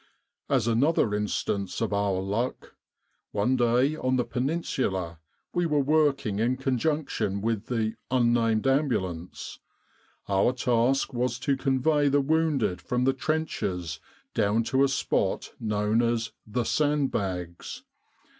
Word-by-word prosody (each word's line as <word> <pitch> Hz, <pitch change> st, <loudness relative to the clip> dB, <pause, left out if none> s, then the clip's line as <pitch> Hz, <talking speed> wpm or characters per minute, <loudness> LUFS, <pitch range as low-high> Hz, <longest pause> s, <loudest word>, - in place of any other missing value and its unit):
"As -, -, +2 dB
another 120 Hz, -1 st, +2 dB
instance 100 Hz, -2 st, -2 dB
of 110 Hz, -2 st, -1 dB
our 100 Hz, -2 st, +1 dB
luck: 105 Hz, +6 st, -3 dB, 0.6 s
one 105 Hz, +6 st, +2 dB
day, 125 Hz, +4 st, +2 dB
on 130 Hz, -4 st, 0 dB
the 125 Hz, -, +2 dB
Peninsula, 120 Hz, -, -2 dB, 0.3 s
we 175 Hz, -1 st, +1 dB
were 150 Hz, -2 st, +1 dB
working 140 Hz, -8 st, +2 dB
in 120 Hz, +3 st, +1 dB
conjunction 130 Hz, -6 st, -1 dB
with 110 Hz, 0 st, -2 dB
the 110 Hz, -3 st, -1 dB, 0.2 s
Ambulance. 120 Hz, -, 0 dB, 0.7 s
Our 100 Hz, +5 st, +2 dB
task 125 Hz, +2 st, +1 dB
was 120 Hz, -1 st, -1 dB
to 140 Hz, 0 st, +1 dB
convey 140 Hz, +2 st, +2 dB
the 145 Hz, +1 st, +3 dB
wounded 145 Hz, -, +1 dB
from 125 Hz, 0 st, -1 dB
the 135 Hz, +1 st, +3 dB
trenches 95 Hz, -, -2 dB, 0.3 s
down 110 Hz, +1 st, +2 dB
to 135 Hz, +1 st, +5 dB
a -, -, +5 dB
spot 135 Hz, -, -1 dB
known 105 Hz, +1 st, +1 dB
as 115 Hz, -1 st, +1 dB
4 -, -, -33 dB
The 120 Hz, +3 st, -1 dB
Sandbags.' 100 Hz, -, -1 dB
120 Hz, 125 wpm, -27 LUFS, 105-135 Hz, 0.7 s, to